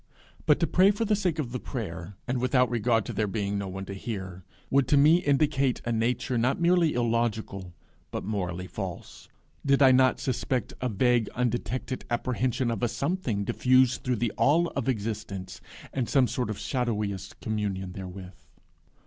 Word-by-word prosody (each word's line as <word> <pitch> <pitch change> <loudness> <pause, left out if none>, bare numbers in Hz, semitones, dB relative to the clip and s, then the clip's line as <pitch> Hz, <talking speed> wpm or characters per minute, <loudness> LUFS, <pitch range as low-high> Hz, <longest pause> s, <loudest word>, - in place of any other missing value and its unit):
But 150 - +5
to - - +4
pray 185 +3 +5
for 205 +3 0
the 210 0 +2
sake 180 -5 -1
of 135 -6 -3
the 125 - -3
prayer, 95 -7 -6
and 125 0 0
without 125 -1 +2
regard 115 -2 +1
to - - -5
there 105 0 0
being 100 0 -2
no 100 - -4
one 95 +1 -6
to 100 - -6
hear, 95 -3 -6 0.3
would 135 -2 +3
to 145 - +4
me 150 +4 +6
indicate 140 -5 +1
a 120 - -1
nature 120 +2 0
not 125 +3 +1
merely 170 -2 +3
illogical 115 -6 -1 0.3
but - - -4
morally 90 -3 -3
false, 95 -1 -7 0.3
did 140 -1 +3
I 130 - +8
not 130 0 +4
suspect 125 -2 -2
a 125 - 0
vague 120 +1 +2
undetected 125 +1 -2
apprehension 125 0 0
of 115 - -3
a 120 - +2
Something 135 - -1
diffused 130 +3 +3
through 125 -1 0
the 115 -1 -1
All 165 +4 +3
of 135 -2 -2
existence, 105 -4 -4 0.3
and 130 -4 -1
some 135 -3 +4
sort 125 -2 -2
of 110 - -3
shadowiest 105 - -2
communion 100 -4 -3
therewith. 95 0 -8
120 Hz, 175 wpm, -27 LUFS, 100-130 Hz, 0.3 s, I